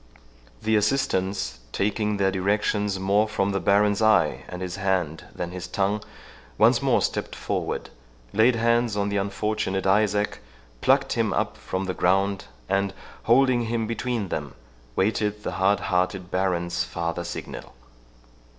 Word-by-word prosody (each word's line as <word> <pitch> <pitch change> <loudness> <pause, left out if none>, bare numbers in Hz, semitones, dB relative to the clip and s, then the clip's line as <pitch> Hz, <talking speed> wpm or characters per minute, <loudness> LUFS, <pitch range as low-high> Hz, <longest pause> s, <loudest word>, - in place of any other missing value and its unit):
The 110 0 +2
assistants, 95 - 0
taking 105 - 0
their 95 -1 +2
directions 100 +1 0
more 100 +3 +2
from 100 -2 0
the 100 - 0
Baron's 105 +2 +3
eye 110 -1 +3
and 90 - -7
his 90 +1 -4
hand 95 -5 -1
than 85 0 -4
his 90 0 -6
tongue, 100 +1 0 0.5
once - - +5
more - - +2
stepped - - -2
forward, - - -3 0.4
laid 115 +3 +4
hands 115 -1 +2
on 100 0 0
the 100 - -1
unfortunate 100 -1 -1
Isaac, 105 +1 +2 0.4
plucked - - +3
him - - +1
up - - -1
from 95 +1 -4
the 95 - -2
ground, 95 +2 +1 0.2
and, 100 0 0 0.3
holding 120 0 +4
him 115 0 -1
between 115 -2 -2
them, 75 -4 -4 0.4
waited 105 +1 0
the - - -2
hard 100 +1 +2
hearted 90 0 -1
Baron's 90 -2 0
farther 85 0 -3
signal. - - -7
100 Hz, 140 wpm, -25 LUFS, 95-105 Hz, 0.5 s, once